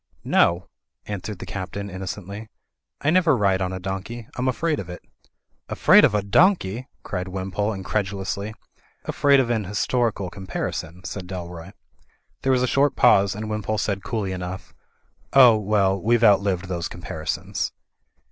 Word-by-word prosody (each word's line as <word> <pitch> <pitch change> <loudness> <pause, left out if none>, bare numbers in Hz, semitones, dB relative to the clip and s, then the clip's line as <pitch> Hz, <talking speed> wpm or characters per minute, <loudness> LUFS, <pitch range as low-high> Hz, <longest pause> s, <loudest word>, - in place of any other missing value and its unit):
"No," 85 +1 +3 0.4
answered 105 0 -5
the - - -8
Captain, 100 +1 -5
innocently, 100 +3 -7 0.5
"I 150 - +2
never 170 -6 +4
ride 100 -3 +2
on 90 0 -1
a 95 - -4
donkey. 95 +5 -5
Fm 130 +1 0
afraid 155 +4 0
of 90 - -7
it." 90 - -8 0.7
"Afraid - - +6
of - - +4
a 105 - +1
donkey!" 120 - +2 0.2
cried 90 -1 -4
Wimpole, 95 +2 -2
incredu 95 +1 -2
lously. 100 +2 -4 0.5
"Afraid 140 -1 +3
of 125 -2 +1
an 110 -3 0
historical 105 -1 -1
comparison," 90 -2 -5
said 95 -3 -6
Dalroy. 90 -1 -7 0.7
There 135 - +1
was 125 -1 +3
a - - +2
short 140 +2 +2
pause, 100 -5 +4
and 110 +1 -5
Wimpole 110 0 -2
said 100 -1 -2
coolly 105 -5 -2
enough, 90 0 -6 0.6
"Oh, 125 -4 +8
well, 100 -2 +1
weVe 120 +3 +2
outlived 100 -3 +3
those 85 -2 -3
comparisons." 80 -3 -4
100 Hz, 150 wpm, -23 LUFS, 95-115 Hz, 0.7 s, Oh